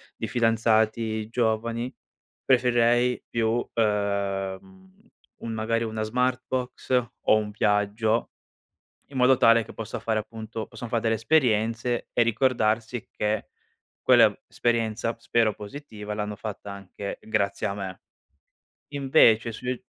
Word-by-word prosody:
di -, -, -4 dB
fidanzati 110 Hz, -1 st, +1 dB
giovani, 115 Hz, +1 st, -1 dB, 0.5 s
preferirei 120 Hz, -1 st, +3 dB
più, 115 Hz, +1 st, 0 dB
ehm, 100 Hz, -3 st, 0 dB
uhm, 190 Hz, +3 st, -21 dB, 0.3 s
un 115 Hz, -, -5 dB
magari 115 Hz, +1 st, 0 dB
una 110 Hz, -1 st, -3 dB
Smartbox 125 Hz, +2 st, -2 dB, 0.3 s
o -, -, +5 dB
un 105 Hz, -1 st, -1 dB
viaggio 105 Hz, +2 st, +1 dB, 0.8 s
in 135 Hz, -, -8 dB
modo 130 Hz, +1 st, +5 dB
tale 115 Hz, -2 st, +5 dB
che -, -, -12 dB
possa 110 Hz, -2 st, -6 dB
fare 110 Hz, -1 st, 0 dB
appunto 110 Hz, 0 st, -7 dB
possono 115 Hz, 0 st, -8 dB
fa 115 Hz, -, +1 dB
delle 115 Hz, 0 st, +1 dB
esperienze 115 Hz, -1 st, +1 dB
e -, -, +2 dB
ricordarsi 115 Hz, -1 st, 0 dB
che 105 Hz, 0 st, -1 dB, 0.6 s
quell'esperienza, 115 Hz, -1 st, +2 dB
spero 115 Hz, -2 st, +1 dB
positiva, 105 Hz, -2 st, -8 dB
l'hanno 105 Hz, 0 st, -3 dB
fatta 100 Hz, -1 st, -7 dB
anche 100 Hz, 0 st, -7 dB
grazie 105 Hz, -1 st, -1 dB
a 100 Hz, -, -2 dB
me. 95 Hz, -2 st, -6 dB, 0.9 s
Invece 125 Hz, -5 st, +4 dB
sui 125 Hz, +3 st, -4 dB
115 Hz, 115 wpm, -26 LUFS, 105-120 Hz, 0.9 s, o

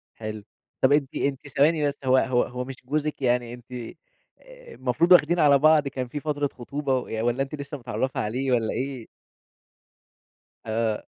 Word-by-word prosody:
حلو. 110 Hz, -1 st, -6 dB, 0.4 s
طب 130 Hz, -, +4 dB
أنتِ 145 Hz, -2 st, +1 dB
أنتِ 140 Hz, 0 st, -2 dB
ثواني 150 Hz, +2 st, +2 dB
بس، 145 Hz, -, -3 dB
هو 130 Hz, 0 st, +5 dB
هو 125 Hz, -2 st, +2 dB
هو 125 Hz, 0 st, -5 dB
مش 135 Hz, -, -7 dB
جوزِك 150 Hz, +2 st, -2 dB
يعني 120 Hz, -2 st, +1 dB
أنت 120 Hz, 0 st, -13 dB
أ 125 Hz, -2 st, -6 dB, 0.8 s
المفروض 130 Hz, +7 st, 0 dB
واخدين 175 Hz, -1 st, +6 dB
على 145 Hz, -2 st, +6 dB
بعض 150 Hz, 0 st, +4 dB
كان 130 Hz, -2 st, -4 dB
في 145 Hz, +5 st, -5 dB
فترة 145 Hz, -1 st, -1 dB
خطوبة 130 Hz, 0 st, -2 dB
ي 110 Hz, -, -2 dB
والّا 120 Hz, +3 st, +1 dB
أنتِ 135 Hz, +2 st, -6 dB
لسّه 145 Hz, 0 st, -6 dB
متعرّفة 130 Hz, +1 st, -3 dB
عليه 130 Hz, +5 st, -2 dB
والّا 115 Hz, -3 st, +1 dB
إيه؟ 130 Hz, -3 st, -4 dB, 1.6 s
آه. 110 Hz, -1 st, -1 dB
130 Hz, 165 wpm, -25 LUFS, 120-145 Hz, 1.6 s, واخدين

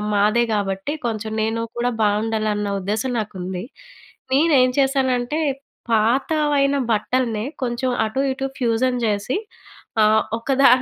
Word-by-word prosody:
మాదే 215 Hz, +4 st, +3 dB
కాబట్టి 195 Hz, +7 st, -2 dB
కొంచెం 220 Hz, -1 st, -3 dB
నేను 225 Hz, +1 st, -1 dB, 0.2 s
కూడా 245 Hz, +1 st, +1 dB
బాగుండాలన్న 210 Hz, -1 st, 0 dB
ఉద్దేశం 215 Hz, +6 st, -2 dB
నాకుంది. 185 Hz, -1 st, -5 dB, 0.7 s
నేను 310 Hz, +3 st, +4 dB
ఏం 255 Hz, -, +3 dB
చేశానంటే 265 Hz, +1 st, +1 dB, 0.5 s
పాతవైన 275 Hz, +5 st, +2 dB, 0.2 s
బట్టల్నే 225 Hz, 0 st, 0 dB, 0.2 s
కొంచెం 250 Hz, +1 st, -1 dB
అటు 220 Hz, +5 st, -2 dB
ఇటు 270 Hz, +1 st, -4 dB
ఫ్యూజన్ 250 Hz, +1 st, +1 dB
చేసి 205 Hz, +3 st, -1 dB, 0.7 s
ఆహ్, 215 Hz, +1 st, +5 dB, 0.2 s
ఒకదా 270 Hz, +3 st, +3 dB
230 Hz, 110 wpm, -21 LUFS, 215-260 Hz, 0.7 s, ఆహ్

